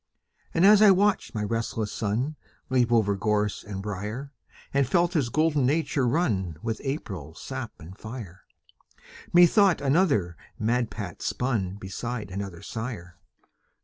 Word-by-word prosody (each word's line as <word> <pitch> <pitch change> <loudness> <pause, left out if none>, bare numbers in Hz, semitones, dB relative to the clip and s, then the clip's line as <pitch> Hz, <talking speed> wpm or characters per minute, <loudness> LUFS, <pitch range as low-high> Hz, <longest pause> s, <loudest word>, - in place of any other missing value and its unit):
And 170 - +4
as 210 +1 +8
I 215 - +8
watched 195 - +2
my 105 - -1
restless 115 0 -2
son 115 +8 -1 0.4
Leap 125 -2 +3
over 105 -4 +3
gorse 105 +1 0
and 100 -2 -6
briar, 105 +8 -5 0.4
And 140 -2 +2
felt 175 +4 +2
his 145 -8 +1
golden 150 -1 +2
nature 145 -2 +1
run 105 - 0
With 115 -1 -3
April 95 - -5
sap - - -6
and 85 +4 -11
fire, 110 -5 -9 0.9
Methought 175 0 +6
another 135 - +2 0.2
madpate 110 -5 -2
spun 110 -8 -1
Beside 105 +2 -5
another 95 -3 -6
sire. 105 -7 -6
115 Hz, 130 wpm, -26 LUFS, 100-145 Hz, 0.9 s, as